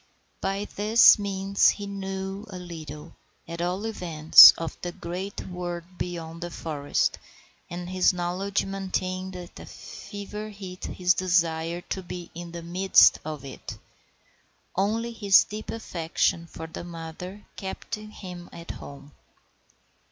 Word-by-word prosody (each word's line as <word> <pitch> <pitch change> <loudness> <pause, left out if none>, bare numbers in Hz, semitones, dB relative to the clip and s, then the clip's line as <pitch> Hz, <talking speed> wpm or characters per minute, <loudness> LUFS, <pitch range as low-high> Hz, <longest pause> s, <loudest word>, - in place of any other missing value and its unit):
By 195 +1 -1
this 215 +3 +6
means 200 0 +2
he 205 - -2
knew 195 0 -5
a 185 - -7
little, 160 -4 -9 0.3
at 170 +1 -5
all 180 +4 -1
events, 165 -8 +9
of 165 -1 -4
the 175 - -3
great 180 +4 -5
world 175 -1 -5 0.2
beyond 170 -1 -5
the 175 - -4
forest, 150 -4 -1 0.5
and 175 0 -6
this 185 0 +3
knowledge 185 +3 -1
maintained 190 -1 -3
at 175 -1 -9
fever 210 +1 -8
heat 190 -3 -8
his 180 -1 +2
desire 170 -2 +1
to 190 - -5
be 175 -1 -8
in 170 0 -8
the 170 0 -7
midst 185 +3 +5
of 150 -3 -6
it. 135 - -8 1.0
Only 220 +5 0
his 205 -4 +5
deep 215 +1 -8
affection 170 -5 -1
for 160 - -8
his 160 - -7
mother 175 +4 -8
kept 190 -1 -7
him 195 -5 -7
at 170 0 -8
home. 140 0 -11
180 Hz, 130 wpm, -26 LUFS, 170-195 Hz, 1.0 s, events